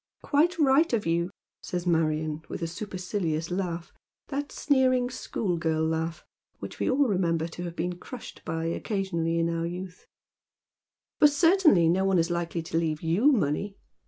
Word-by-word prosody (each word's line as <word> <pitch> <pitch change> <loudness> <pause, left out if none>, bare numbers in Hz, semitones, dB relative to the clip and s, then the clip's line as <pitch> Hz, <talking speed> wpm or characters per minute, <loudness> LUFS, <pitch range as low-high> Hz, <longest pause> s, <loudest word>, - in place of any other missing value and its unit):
" - - -50
Quite 330 +5 +2
right 300 +1 +4
of 220 -3 +1
you," 170 +1 +1 0.3
says 180 0 -4
Marion, 155 -2 0
with - - -5
a - - 0
supercilious 180 -3 -3
laugh 175 -2 -3 0.2
— - - -66
that 285 0 -3
sneering 255 -3 +2
school 190 -7 -2
girl 160 -1 0
laugh, 160 +1 -2 0.3
which - - -8
we - - +1
all 270 +1 +3
remember 170 -5 +1
to 175 +2 -7
have 170 -1 -6
been 175 +1 -3
crushed 250 +4 -9
by 165 0 -3
occasionally 170 -2 -1
in 165 0 +2
our 165 0 -1
youth, 180 +1 -7 0.4
— - - -66
" - - -66
for 300 - +8
certainly 310 - +4
no 180 +3 +2
one 195 -1 +3
is 165 +1 +1
likely 170 -1 -2
to 165 0 -1
leave 155 -2 -2
you 190 - +4
money." 195 - 0
175 Hz, 180 wpm, -27 LUFS, 165-225 Hz, 0.4 s, for